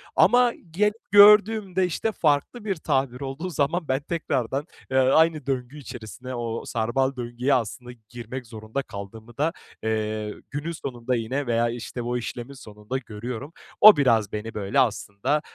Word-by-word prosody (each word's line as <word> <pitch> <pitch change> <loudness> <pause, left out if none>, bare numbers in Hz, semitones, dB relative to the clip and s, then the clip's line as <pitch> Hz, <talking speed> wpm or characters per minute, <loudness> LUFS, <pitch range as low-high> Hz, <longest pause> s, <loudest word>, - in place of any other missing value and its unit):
Ama 245 +4 +5 0.2
gel 210 +5 +2 0.2
gördüğümde, 205 -2 +6
işte, 180 +5 -1
farklı 160 - 0
bir 195 -3 0
tabir 135 -5 -1
olduğu 140 +6 -4
zaman 160 +1 -1
ben 130 +1 0
tekrardan, 140 -4 -2 0.3
eee, 130 - +2
aynı 155 +3 +4
döngü 130 +1 -3
içerisine 125 -1 -8
o 115 -1 -4
sarmal 130 +4 0
döngüye 125 +2 -1
aslında 125 +1 -2 0.2
girmek 120 +1 -7
zorunda 110 +3 -5
kaldığımı 110 +1 -10
da, 155 +4 +1 0.3
eee, 110 -1 -2 0.2
günün 150 +4 -3
sonunda 125 -6 -3
yine, 125 +4 -2
veya, 115 0 +2
işte, 120 +1 -5
o 120 +1 -2
işlemin 120 +2 -6
sonunda 105 -1 -6
görüyorum. 125 +4 -7 0.3
O 215 0 +10
biraz 115 -7 +3
beni, 110 +1 -5
böyle, 105 +6 0
aslında 110 +3 0
130 Hz, 145 wpm, -25 LUFS, 115-150 Hz, 0.3 s, O